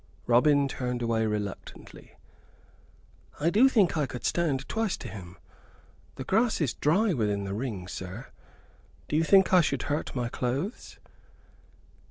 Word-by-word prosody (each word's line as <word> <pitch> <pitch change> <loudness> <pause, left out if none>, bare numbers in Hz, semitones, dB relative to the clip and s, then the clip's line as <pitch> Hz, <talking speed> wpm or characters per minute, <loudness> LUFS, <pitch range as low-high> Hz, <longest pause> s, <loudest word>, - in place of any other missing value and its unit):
Robin 140 +4 +4
turned 125 -2 -3
away 110 -1 +1
reluctantly. 105 -2 -6 1.2
"I 165 +3 +2
do 245 +8 +5
think 210 -9 +3
I 150 -3 0
could 125 - -7
stand 145 -6 0
twice 225 -4 -1
to - - -8
him. 90 -4 -10 0.8
The - - -6
grass 220 - +1
is 150 -8 0
dry 190 +7 +2
within 105 -6 -1
the 100 0 -4
ring, 105 -5 -4
sir 95 +7 -8 0.8
do - - -2
you 160 - +3
think 190 +2 +4
I 180 - +7
should 160 - -1
hurt 145 -1 -3
my 125 -2 -1
clothes?" 130 - -4
135 Hz, 145 wpm, -28 LUFS, 110-170 Hz, 1.2 s, I